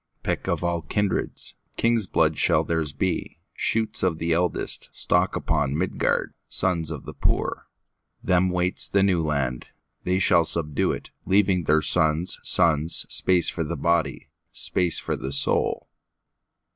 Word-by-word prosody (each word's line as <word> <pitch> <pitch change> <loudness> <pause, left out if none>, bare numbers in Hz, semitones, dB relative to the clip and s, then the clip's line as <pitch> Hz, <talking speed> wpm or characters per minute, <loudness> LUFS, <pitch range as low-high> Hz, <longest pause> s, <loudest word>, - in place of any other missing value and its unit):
Pick - - -3
of - - -1
all 85 -1 -1
kindreds, 100 +5 -1 0.2
King's 115 -3 +1
blood 80 -2 +1
shall - - +3
theirs 80 -3 -2
be, 95 +4 -3 0.2
Shoots 110 0 0
of 90 -4 0
the 85 +1 -2
eldestStock 85 +1 0
upon 70 +2 -1
Midgard, 95 +3 -1 0.2
Sons 85 -5 +1
of 75 -4 -6
the - - -8
poor. - - -2 0.6
Them 90 0 +2
waits 90 0 +1
the 100 -1 +2
New 95 -4 +2
Land; 70 -5 -2 0.4
They 90 +1 0
shall 90 -2 +4
subdue 75 -3 -1
it, - - -7 0.2
Leaving 95 -3 +2
their 75 +1 +2
sons' 80 +1 +2
sonsSpace 85 +2 +2
for 85 - -3
the 85 +2 -4
body, 85 -1 -1 0.2
Space 90 -2 +1
for - - -2
the 65 - -6
soul. 70 - +2
85 Hz, 140 wpm, -24 LUFS, 80-95 Hz, 0.6 s, shall